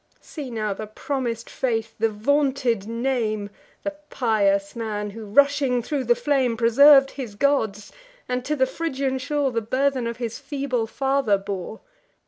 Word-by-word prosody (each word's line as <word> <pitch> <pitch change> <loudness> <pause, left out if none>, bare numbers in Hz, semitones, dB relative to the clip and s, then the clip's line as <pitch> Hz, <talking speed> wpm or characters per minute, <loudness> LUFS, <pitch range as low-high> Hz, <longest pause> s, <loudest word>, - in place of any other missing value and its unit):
See 290 -5 -8
now 215 -3 -2
the 215 +2 -7
promis'd 235 0 -3
faith, 225 -3 -2
the 225 +1 +3
vaunted 255 -1 +1
name, 230 -4 -1 0.3
The 300 - -2 0.2
pious 200 -4 +1
man, 210 -3 -3
who, 220 +1 -8
rushing 275 +1 +3
thro' 285 +2 -2
the 240 -1 +3
flame, 250 -2 +1
Preserv'd 270 +4 +6
his 245 -7 -7
gods, 220 -6 0 0.4
and 250 0 -2
to 300 +3 -1
the 260 -2 +3
Phrygian 270 -2 -2
shore 280 0 0
The 230 -1 -1
burthen 260 +2 0
of 235 0 -4
his 235 -2 -4
feeble 270 -5 -2
father 270 -4 +1
bore! 195 +2 -6
240 Hz, 150 wpm, -24 LUFS, 220-275 Hz, 0.4 s, Preserv'd